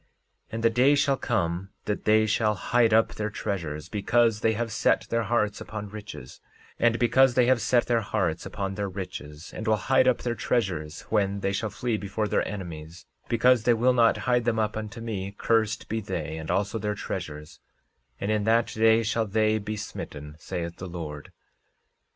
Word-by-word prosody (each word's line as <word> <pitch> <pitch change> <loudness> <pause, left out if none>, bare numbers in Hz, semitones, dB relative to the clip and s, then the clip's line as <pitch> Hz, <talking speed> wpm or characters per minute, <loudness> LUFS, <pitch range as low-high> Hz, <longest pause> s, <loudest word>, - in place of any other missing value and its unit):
13:20 - - -25
And 115 0 -3
the 115 - +6
day 130 +5 +4
shall 140 -1 +2
come 95 -7 -1 0.2
that 105 - -3
they 110 0 +5
shall 105 0 +1
hide 115 +3 +2
up 110 +1 +4
their 105 0 -3
treasures, 85 -8 -4
because 110 +2 +2
they 110 +1 +2
have 115 +1 -2
set - - +2
their 115 - +2
hearts 105 -1 0
upon 105 -1 -6
riches; 105 -11 -9 0.4
and 115 -1 +3
because 125 +1 +4
they 125 - +5
have 125 -1 +3
set 120 +2 +2
their 115 -1 +1
hearts 95 -6 -1
upon 95 -1 -4
their 100 0 -3
riches, 85 -5 -8
and 110 - -6
will 110 - +4
hide 130 +3 +2
up 125 - +2
their 120 - 0
treasures 85 -11 -2
when 100 -2 +1
they 95 - 0
shall 105 +2 -2
flee 110 +2 -2
before 105 +1 -2
their - - 0
enemies; 85 -4 -7 0.2
because 120 +1 +4
they 120 +1 +3
will 125 +3 +3
not 115 -2 +4
hide 125 -1 +2
them 115 -2 +1
up 110 -1 0
unto 110 +1 -5
me, 100 -3 -4
cursed 110 -1 +1
be 110 +1 -2
they 95 -5 -4
and 80 -1 -7
also 100 +3 0
their 105 0 -2
treasures; 75 -5 -6 0.6
and 100 - -1
in 105 -1 +1
that 115 +2 +3
day 110 +1 +4
shall 115 0 0
they 110 +1 +2
be 105 +1 -4
smitten, 75 -7 -7
saith 85 +1 -5
the 95 - -7
Lord. 75 -4 -7
110 Hz, 190 wpm, -26 LUFS, 95-115 Hz, 0.6 s, the